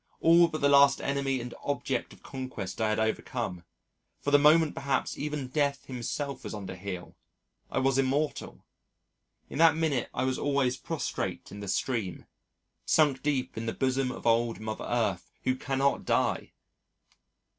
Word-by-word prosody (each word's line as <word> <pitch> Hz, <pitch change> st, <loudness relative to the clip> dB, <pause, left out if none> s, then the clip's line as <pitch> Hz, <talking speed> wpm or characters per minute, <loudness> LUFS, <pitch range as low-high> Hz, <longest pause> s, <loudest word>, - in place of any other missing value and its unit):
All 170 Hz, +1 st, +6 dB
but 155 Hz, -2 st, -5 dB
the 140 Hz, -, +4 dB
last 140 Hz, -1 st, +6 dB
enemy 135 Hz, -1 st, -1 dB
and 120 Hz, 0 st, -6 dB
object 145 Hz, -, -2 dB
of -, -, -16 dB
conquest 130 Hz, -7 st, -6 dB
I 110 Hz, -, +2 dB
had 110 Hz, -, +1 dB
overcome 110 Hz, -4 st, -2 dB, 0.6 s
for 145 Hz, -, -2 dB
the 145 Hz, -, +7 dB
moment 155 Hz, +2 st, +5 dB
perhaps 135 Hz, -1 st, -1 dB
even 145 Hz, -3 st, -4 dB
Death 140 Hz, 0 st, 0 dB
himself 130 Hz, +2 st, -4 dB
was -, -, -5 dB
under 95 Hz, -3 st, -6 dB
heel 95 Hz, -1 st, -7 dB, 0.5 s
I -, -, -4 dB
was 135 Hz, 0 st, +2 dB
immortal 140 Hz, +3 st, -1 dB, 0.8 s
in -, -, -6 dB
that 165 Hz, -1 st, +7 dB
minute 155 Hz, -6 st, 0 dB
I 125 Hz, -, -2 dB
was 130 Hz, 0 st, 0 dB
always 140 Hz, -3 st, +1 dB
prostrate 155 Hz, +4 st, -4 dB
in 100 Hz, -, -8 dB
the 100 Hz, -, -6 dB
stream 100 Hz, -3 st, -2 dB, 0.6 s
sunk 145 Hz, -4 st, +3 dB
deep 135 Hz, -3 st, -1 dB
in 115 Hz, +1 st, -4 dB
the 115 Hz, -, -1 dB
bosom 130 Hz, -1 st, 0 dB
of -, -, -9 dB
old 115 Hz, 0 st, +2 dB
Mother 110 Hz, 0 st, -5 dB
Earth 105 Hz, -7 st, -1 dB
who 130 Hz, 0 st, +1 dB
cannot 135 Hz, +1 st, 0 dB
die! -, -, 0 dB
130 Hz, 160 wpm, -29 LUFS, 115-140 Hz, 0.8 s, the